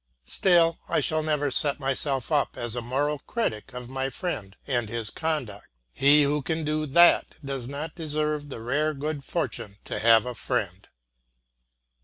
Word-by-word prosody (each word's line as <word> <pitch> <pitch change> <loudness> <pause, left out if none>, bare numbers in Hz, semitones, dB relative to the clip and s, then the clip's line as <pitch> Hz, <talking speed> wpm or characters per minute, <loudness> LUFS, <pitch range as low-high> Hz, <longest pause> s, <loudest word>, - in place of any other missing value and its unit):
Still 170 - +3
I - - +2
shall 155 0 0
never 150 -2 0
set 145 +2 +3
myself 135 0 -1
up 145 -2 +1
as 120 -1 -1
a 120 - -2
moral 140 +5 -1
critic 135 - -3
of 125 -1 -7
my 135 +1 -3
friend 130 - -5
and 120 -5 -1
his 115 -2 -2
conduct; 140 -11 -3 0.3
he 145 - +6
who 145 +1 +1
can 160 +3 -2
do 155 0 -1
that 170 +5 +5
does 135 -3 -4
not 145 +3 -5
deserve 150 -2 -2
the 115 - -7
rare 150 +6 0
good 145 0 -4
fortune 120 - -3
to - - -4
have 115 0 +5
a 125 - -4
friend. 100 -7 -3
140 Hz, 165 wpm, -26 LUFS, 120-155 Hz, 0.3 s, he